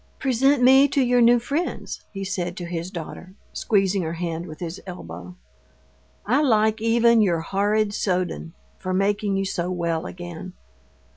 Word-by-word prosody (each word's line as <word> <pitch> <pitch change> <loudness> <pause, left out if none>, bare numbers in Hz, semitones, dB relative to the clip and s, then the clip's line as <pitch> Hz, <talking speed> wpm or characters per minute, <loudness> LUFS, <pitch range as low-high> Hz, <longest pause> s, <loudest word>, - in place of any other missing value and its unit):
"Present 270 +1 +2
me 265 +2 +7
to 280 0 +1
your 245 0 +3
new 240 +1 +6
friends," 285 +9 -3
he 195 -1 -5
said 180 -2 -3
to 175 - -5
his 170 0 -4
daughter, 185 +1 -8 0.2
squeezing 195 -3 +1
her 160 -1 -3
hand 170 0 -4
with 155 - -10
his 175 +1 -6
elbow. 90 - -9 0.9
"I 255 +7 +2
like 220 -5 +2
even 230 0 +4
your 175 -5 +2
horrid 205 +4 0
Soden 180 -4 -2 0.2
for 185 0 -3
making 200 +1 +1
you 195 - -1
so 180 -2 -2
well 170 -1 -2
again. 175 0 -8
195 Hz, 155 wpm, -23 LUFS, 175-230 Hz, 0.9 s, me